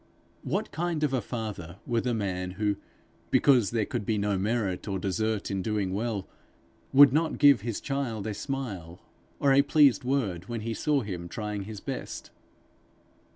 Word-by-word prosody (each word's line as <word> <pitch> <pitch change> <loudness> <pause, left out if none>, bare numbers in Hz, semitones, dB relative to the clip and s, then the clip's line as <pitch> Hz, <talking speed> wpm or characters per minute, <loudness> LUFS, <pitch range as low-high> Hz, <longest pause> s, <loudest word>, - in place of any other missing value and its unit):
What - - -2
kind 165 0 -2
of 145 -3 +1
a 130 - +1
father 100 -7 -6
were 120 -2 +1
the 120 -1 -1
man 90 -3 -2
who, 105 -1 +1 0.5
because 125 -8 +4
there 115 -3 0
could - - -3
be 110 +1 0
no 100 0 0
merit 100 -1 -1
or 95 -2 -1
desert 105 +3 -1
in 95 -1 -1
doing 100 -2 -1
well, 105 -2 -2 0.6
would 140 -1 +8
not 160 +2 +1
give 140 -7 +6
his 115 -1 -3
child 125 -7 -3
a 110 - -2
smile 100 - -5 0.4
or 140 -1 +4
a 135 - +7
pleased 145 -2 +4
word 110 -9 -1
when 115 -2 -3
he 115 +1 -3
saw 145 +4 +1
him 90 -5 -5
trying 105 -2 -4
his 105 -1 -8
best? - - -6
110 Hz, 170 wpm, -28 LUFS, 100-135 Hz, 0.6 s, would